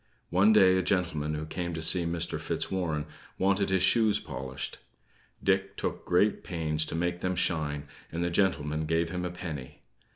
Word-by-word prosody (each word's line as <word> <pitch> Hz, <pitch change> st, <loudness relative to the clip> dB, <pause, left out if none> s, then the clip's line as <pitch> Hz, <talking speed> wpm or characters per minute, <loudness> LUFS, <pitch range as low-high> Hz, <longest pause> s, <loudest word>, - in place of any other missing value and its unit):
One 95 Hz, +5 st, +5 dB
day, 95 Hz, -4 st, +6 dB
a -, -, +3 dB
gentleman 80 Hz, -6 st, 0 dB
who 75 Hz, +1 st, -4 dB
came 85 Hz, +1 st, -4 dB
to 80 Hz, -, -4 dB
see 85 Hz, +2 st, +3 dB
Mr. 85 Hz, 0 st, -2 dB
Fitzwarren 80 Hz, -6 st, -1 dB, 0.3 s
wanted 100 Hz, +1 st, +2 dB
his 95 Hz, -1 st, +2 dB
shoes 110 Hz, +2 st, +4 dB
polished; 65 Hz, +1 st, -6 dB, 0.6 s
Dick 95 Hz, 0 st, +1 dB
took -, -, -3 dB
great 95 Hz, +4 st, +2 dB
pains 80 Hz, -4 st, -1 dB
to -, -, -3 dB
make 85 Hz, +1 st, -1 dB
them 90 Hz, +1 st, -1 dB
shine, 75 Hz, -5 st, 0 dB, 0.3 s
and 85 Hz, +2 st, -2 dB
the 85 Hz, -, 0 dB
gentleman 80 Hz, -5 st, +1 dB
gave 80 Hz, +1 st, +1 dB
him 90 Hz, 0 st, -3 dB
a -, -, -1 dB
penny. 85 Hz, -7 st, -7 dB
85 Hz, 170 wpm, -29 LUFS, 80-95 Hz, 0.6 s, day